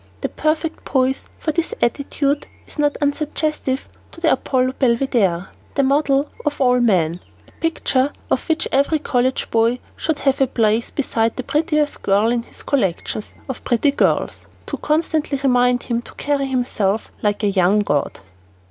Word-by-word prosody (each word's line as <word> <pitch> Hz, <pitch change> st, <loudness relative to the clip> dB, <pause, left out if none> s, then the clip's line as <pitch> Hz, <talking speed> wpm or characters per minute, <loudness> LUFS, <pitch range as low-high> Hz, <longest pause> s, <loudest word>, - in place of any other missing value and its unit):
The -, -, -1 dB
perfect 310 Hz, +1 st, -1 dB
poise 265 Hz, 0 st, 0 dB, 0.2 s
of 310 Hz, 0 st, -1 dB
his 335 Hz, -, -1 dB
attitude 280 Hz, +3 st, 0 dB, 0.2 s
is -, -, -14 dB
not 290 Hz, -1 st, +2 dB
unsuggestive 290 Hz, -2 st, -1 dB, 0.2 s
of 335 Hz, -, -13 dB
the 320 Hz, -, +3 dB
Apollo 255 Hz, -1 st, +1 dB
Belvedere 235 Hz, -8 st, +2 dB, 0.3 s
the 275 Hz, -, +3 dB
model 280 Hz, +1 st, +2 dB, 0.2 s
for 275 Hz, -3 st, 0 dB
all 250 Hz, -, +3 dB
men 180 Hz, -8 st, +2 dB, 0.3 s
a -, -, -21 dB
picture 290 Hz, -4 st, +1 dB, 0.2 s
of -, -, 0 dB
which 320 Hz, 0 st, +1 dB
every 280 Hz, +4 st, +3 dB
college 260 Hz, -3 st, 0 dB
boy 230 Hz, +2 st, +3 dB, 0.2 s
should 320 Hz, -2 st, -1 dB
have 275 Hz, -1 st, +1 dB
to 270 Hz, -, +3 dB
place 225 Hz, -1 st, +1 dB
beside 230 Hz, -5 st, 0 dB
the 255 Hz, -, -4 dB
prettiest 300 Hz, +1 st, 0 dB
girl 205 Hz, +4 st, +3 dB
in 240 Hz, -1 st, +1 dB
his -, -, -11 dB
collection 215 Hz, -5 st, 0 dB, 0.3 s
of 265 Hz, -, -6 dB
pretty 250 Hz, +4 st, +2 dB
girls, 280 Hz, -, 0 dB, 0.2 s
to -, -, -4 dB
constantly 310 Hz, -2 st, 0 dB
remind 250 Hz, -2 st, +3 dB
him 235 Hz, -1 st, -1 dB
to -, -, -14 dB
carry 285 Hz, -1 st, 0 dB
himself 225 Hz, -5 st, -1 dB
like 210 Hz, +1 st, 0 dB
a 205 Hz, -, +3 dB
young 195 Hz, +2 st, +3 dB
god. 145 Hz, -, -1 dB
265 Hz, 160 wpm, -20 LUFS, 230-290 Hz, 0.3 s, the